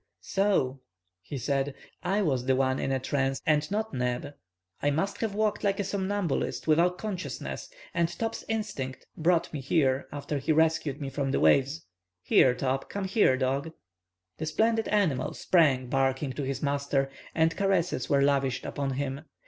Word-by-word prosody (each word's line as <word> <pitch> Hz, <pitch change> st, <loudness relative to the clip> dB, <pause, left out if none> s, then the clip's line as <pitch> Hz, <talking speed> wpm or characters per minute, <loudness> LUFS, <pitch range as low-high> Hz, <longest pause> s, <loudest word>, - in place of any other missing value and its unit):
"So," 190 Hz, -10 st, +1 dB, 0.4 s
he 140 Hz, +10 st, -6 dB
said, 135 Hz, +2 st, -1 dB, 0.3 s
"I 200 Hz, +3 st, +1 dB
was 130 Hz, -7 st, 0 dB
the 130 Hz, -, +4 dB
one 130 Hz, 0 st, +1 dB
in 135 Hz, -, -1 dB
a 135 Hz, -, +2 dB
trance, 135 Hz, 0 st, -1 dB
and 150 Hz, -2 st, +2 dB
not 215 Hz, -1 st, -2 dB
Neb! 125 Hz, +2 st, -2 dB, 0.5 s
I 145 Hz, -, +2 dB
must 165 Hz, +8 st, -1 dB
have 220 Hz, -3 st, -2 dB
walked 215 Hz, 0 st, 0 dB
like 200 Hz, -1 st, +1 dB
a -, -, +1 dB
somnambulist, 190 Hz, -9 st, -1 dB
without 170 Hz, +3 st, +3 dB
consciousness, 200 Hz, -3 st, -5 dB, 0.2 s
and 170 Hz, -1 st, +1 dB
Top's 225 Hz, +5 st, -4 dB
instinct 175 Hz, -13 st, -3 dB
brought 170 Hz, +1 st, +1 dB
me 145 Hz, -, -3 dB
here 135 Hz, -1 st, +1 dB
after 145 Hz, 0 st, -3 dB
he 140 Hz, +4 st, 0 dB
rescued 160 Hz, -2 st, +2 dB
me 140 Hz, -2 st, -4 dB
from 140 Hz, -1 st, -1 dB
the -, -, +1 dB
waves. 140 Hz, +4 st, +3 dB, 0.4 s
Here, 125 Hz, -1 st, +5 dB
Top. 135 Hz, +1 st, -1 dB
Come 200 Hz, -, -3 dB
here, 190 Hz, -, +3 dB
dog." 135 Hz, +4 st, -1 dB, 0.7 s
The 155 Hz, -, -3 dB
splendid 225 Hz, +7 st, +1 dB
animal 170 Hz, -12 st, +1 dB
sprang, 145 Hz, -8 st, +3 dB
barking, 135 Hz, +1 st, 0 dB
to 145 Hz, -, -4 dB
his 135 Hz, +1 st, -3 dB
master, 140 Hz, -1 st, 0 dB, 0.2 s
and 160 Hz, 0 st, +3 dB
caresses 195 Hz, -4 st, 0 dB
were 140 Hz, -2 st, +4 dB
lavished 135 Hz, -2 st, +1 dB
upon 140 Hz, -1 st, -2 dB
him. 135 Hz, +1 st, -3 dB
145 Hz, 165 wpm, -28 LUFS, 135-180 Hz, 0.7 s, Here